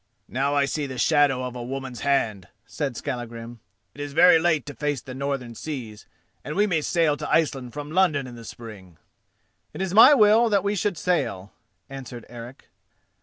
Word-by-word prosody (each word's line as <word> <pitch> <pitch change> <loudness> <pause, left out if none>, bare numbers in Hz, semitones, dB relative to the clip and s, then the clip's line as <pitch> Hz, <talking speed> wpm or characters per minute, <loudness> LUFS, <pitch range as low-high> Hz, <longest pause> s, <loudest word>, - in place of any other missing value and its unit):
"Now, 140 +3 -1
I 140 -1 +3
see 145 +1 -3
the 130 -1 -7
shadow 135 0 +3
of 125 -1 -5
a 125 - -6
woman's 130 0 -6
hand," 110 -9 0 0.2
said 135 -6 -4
Skallagrim. 120 -1 -6 0.3
"It 145 - -9
is 145 -1 -6
very 165 +1 +6
late 160 -4 +1
to 145 - -7
face 145 -2 -2
the 130 - -10
northern 135 -3 -4
seas, 115 -5 -7 0.4
and 150 - -6
we 205 +2 +3
may 170 -6 0
sail 160 -1 +1
to - - -6
Iceland 135 -6 0
from 145 0 -7
London 165 -6 +2
in 125 - -9
the 115 -1 -11
spring." 105 -7 -11 0.8
"It - - -8
is 190 -1 -2
my 255 +8 +9
will 220 0 +5
that 200 -2 +2
we 200 0 0
should 200 -2 -1
sail," 150 - -2 0.3
answered 130 -3 -9
Eric. 120 +2 -11
140 Hz, 185 wpm, -24 LUFS, 120-160 Hz, 0.8 s, my